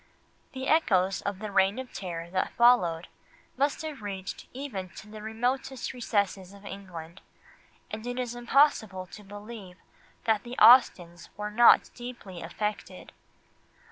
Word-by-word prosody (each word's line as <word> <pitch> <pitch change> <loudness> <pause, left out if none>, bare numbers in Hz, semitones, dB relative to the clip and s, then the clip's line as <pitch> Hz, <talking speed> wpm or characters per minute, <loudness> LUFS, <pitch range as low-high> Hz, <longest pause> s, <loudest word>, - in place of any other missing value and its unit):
The 265 0 -5
echoes 195 - +2
of 200 -1 -3
the 215 +1 -6
Reign 195 +2 +3
of 260 -1 -7
Terror 170 -2 -6
that 185 - -1
followed 185 -9 +4 0.5
must 280 +3 0
have 305 -6 -6
reached 195 -2 -6
even 245 -9 -6
to - - -10
the 215 0 -10
remotest 245 +5 -2
recesses 200 -6 -1
of 200 0 -15
England, 175 -4 -9 0.7
and 220 +2 -6
it 245 0 -4
is 245 -2 -2
impossible 240 -6 +2
to 210 +3 -12
believe 205 -2 -10 0.5
that 220 -3 +2
the 240 +3 -9
Austens 175 -9 +5
were 210 0 -4
not 235 +3 +6
deeply 240 -7 -9
affected. 210 +5 -5
210 Hz, 140 wpm, -28 LUFS, 190-245 Hz, 0.7 s, not